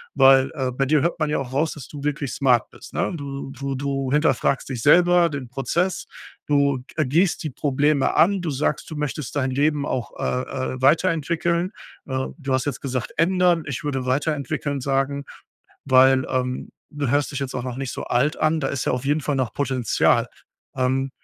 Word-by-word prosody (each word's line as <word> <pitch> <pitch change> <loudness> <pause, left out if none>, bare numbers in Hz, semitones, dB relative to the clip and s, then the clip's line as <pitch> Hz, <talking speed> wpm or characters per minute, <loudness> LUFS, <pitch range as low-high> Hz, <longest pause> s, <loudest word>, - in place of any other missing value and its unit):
weil, 135 -1 +6
äh, 130 -3 -1
bei 135 +2 0
dir 150 +1 +3
hört 170 - -1
man 155 -1 0
ja - - 0
auch 130 -2 -6
raus, 150 +4 +1
dass 150 - -10
du 145 -2 -9
wirklich 145 -2 -2
smart 125 -4 +2
bist, - - -13
ne? - - 0
Du 140 -3 -6
du 140 0 -4
du 135 -1 -2
hinterfragst 145 -2 +1
dich 125 -4 -4
selber, 175 +3 +5
den 140 -3 -5
Prozess, 135 +9 -1 0.4
du, 140 -2 +2
g 160 - -3
äh, 150 - +2
gehst 165 +7 +1
die 155 - -3
Probleme 145 +1 +1
an. 195 +3 +4
Du 170 - -2
sagst, 140 +1 -1
du 160 - -6
möchtest 150 -2 -4
dein 130 -2 0
Leben 145 +2 +1
auch, 125 -4 -3
äh, 130 +1 -2
äh, 130 - -8
weiterentwickeln. 170 +3 +2 0.4
Äh, 130 0 -2
du 140 -3 -3
hast 130 -1 +1
jetzt 145 - -3
gesagt 130 -3 -3
„ändern“. 175 -1 +3
Ich 140 +3 -4
würde 135 -3 -2
„weiterentwickeln“ 145 0 -1
sagen, 135 +1 0 0.6
weil, 130 0 +5
ähm, 125 -1 -2 0.2
du 145 -3 -3
hörst 145 +3 +1
dich 140 - -3
jetzt 135 -2 -4
auch 125 - -2
noch 125 -1 -4
nicht 135 -2 -3
so - - -5
alt 140 +6 +1
an. 155 +1 +2
Da 135 - -1
ist 135 -3 -2
ja - - +2
auf 125 +1 -2
jeden 150 +2 +2
Fall 145 0 -1
noch 125 -4 -1
Potenzial. 130 -5 +1 0.5
Ähm, 130 +1 0
140 Hz, 200 wpm, -23 LUFS, 130-150 Hz, 0.6 s, weil